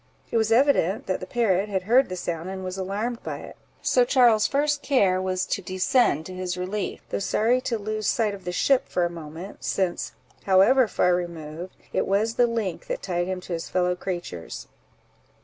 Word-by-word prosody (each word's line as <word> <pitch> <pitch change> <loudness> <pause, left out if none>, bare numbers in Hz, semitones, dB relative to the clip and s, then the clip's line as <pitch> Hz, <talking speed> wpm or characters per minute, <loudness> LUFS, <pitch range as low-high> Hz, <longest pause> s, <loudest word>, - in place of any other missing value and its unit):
It - - +2
was 220 0 +1
evident 230 - +3
that 185 - -1
the 185 - -7
parrot 205 -3 +1
had 190 -2 -1
heard 240 +5 +4
the 185 - -3
sound, 175 -1 -4
and 190 0 -5
was 185 0 -4
alarmed 205 +5 -3
by - - -5
it; - - -10 0.3
so 250 - +4
Charles's 240 -4 +4
first 290 +1 +1
care 195 -10 +2
was 185 0 -1
to 195 - -2
descend 185 - +2
to 185 - -7
his 185 -1 -3
relief, 190 +3 -3
though - - -1
sorry 230 +5 +2
to 235 -2 -1
lose 215 0 -3
sight 220 -3 +1
of 195 -2 -9
the 180 - -3
ship 270 +8 +2
for 180 - +1
a 170 - -2
moment, 165 +3 -9
since, 185 -3 -1 0.3
however 210 +7 +5
far 180 -3 +2
removed, 170 0 -5 0.2
it - - 0
was 210 +4 +1
the 245 +1 +3
link 220 -7 -3
that - - -4
tied 175 -1 -1
him 185 -1 -3
to 180 - -6
his 165 - -4
fellow 180 -1 +1
creatures. 175 - -6
190 Hz, 200 wpm, -25 LUFS, 180-225 Hz, 0.3 s, however